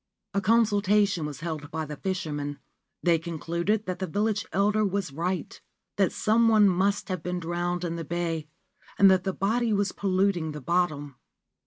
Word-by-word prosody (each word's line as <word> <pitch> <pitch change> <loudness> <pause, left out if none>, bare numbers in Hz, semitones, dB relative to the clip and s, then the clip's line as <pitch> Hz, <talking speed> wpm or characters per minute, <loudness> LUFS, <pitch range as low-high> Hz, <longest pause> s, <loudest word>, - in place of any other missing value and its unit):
A 200 - +1
consultation 205 -4 +3
was 150 0 -8
held 155 -3 -5
by 160 0 -3
the 150 0 -6
fishermen. 145 -5 -3 0.5
They 170 -2 +4
concluded 170 +5 -2
that 185 -1 -4
the 190 - -2
village 205 +4 -1
elder 210 +2 +2
was 195 -6 -1
right 175 +5 -3 0.2
— - - -56
that - - +3
some 225 +2 +2
one 215 -2 +6
must 195 +2 +1
have 185 -3 -2
been 180 +2 -3
drowned 175 +1 -2
in 170 -1 -2
the 165 - -4
bay, 165 -1 -3 0.5
and 195 -1 +7
that 185 0 +2
the 190 - +1
body 225 +5 0
was 200 -2 +1
polluting 185 -4 0
the 150 - -6
bottom. 145 -3 -1
180 Hz, 175 wpm, -27 LUFS, 165-200 Hz, 0.5 s, and